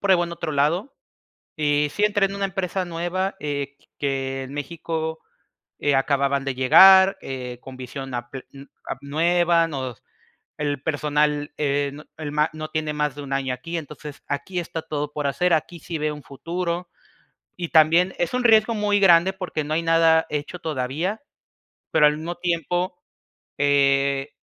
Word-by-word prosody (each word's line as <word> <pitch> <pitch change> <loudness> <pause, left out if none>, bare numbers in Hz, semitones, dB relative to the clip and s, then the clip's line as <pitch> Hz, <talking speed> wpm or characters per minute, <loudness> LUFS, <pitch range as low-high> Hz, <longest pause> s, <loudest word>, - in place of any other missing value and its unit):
pruebo 190 -3 +3
en 170 - -7
otro 165 -2 -4
lado". 155 - 0 0.6
Y 150 -1 +1
sí, 205 - -1
entré 205 -1 +3
en 195 - -7
una 200 - -1
empresa 190 -1 -2
nueva, 175 +3 -2
eh, 140 -1 -3
q - - -28
que 135 -1 -2
en 130 +1 -9
México, 160 +2 -4 0.6
eh, 145 -1 +2
acababan 140 0 +1
de 135 - -1
llegar, 190 +9 +7
eh, 125 -2 -6
con 130 - -10
visión 130 +1 -7
a 120 0 -5
pe 135 -1 -8
uh 140 0 -11 0.2
ap 135 - -5
nueva, 170 +3 +2
nos 130 -6 -6 0.5
El 145 -2 -2
personal, 150 -1 0
eh, 140 -1 0
no 150 +2 -11
el, 150 -2 -5
ma 150 +1 +2
no 155 0 -6
tiene 155 -1 -2
más 150 -1 -1
de 145 - -7
un 135 - -5
año 135 -1 -1
aquí, 165 +7 -5
entonces 150 -2 -9
aquí 175 +6 -3
está 165 -1 -5
todo 150 -1 -4
por 145 -1 -2
hacer, 175 +5 +1
aquí 165 +2 -1
sí 165 0 -5
veo 150 0 -1
un 150 - -11
futuro. 170 +5 -4 0.7
Y 175 -2 -4
también 165 +4 +4
es 175 +7 -1
un 250 - 0
riesgo 225 0 +5
muy 205 -1 +1
grande 180 -1 +6
porque 180 -5 -4
no 150 - -4
hay 165 - 0
nada 165 -1 +4
hecho 150 +4 -4
todavía, 160 - -2 0.7
pero 150 - +6
al 150 0 0
mismo 165 +3 -4
tiempo, 175 - -1 0.6
eh, 140 0 +2
155 Hz, 175 wpm, -23 LUFS, 140-175 Hz, 0.7 s, llegar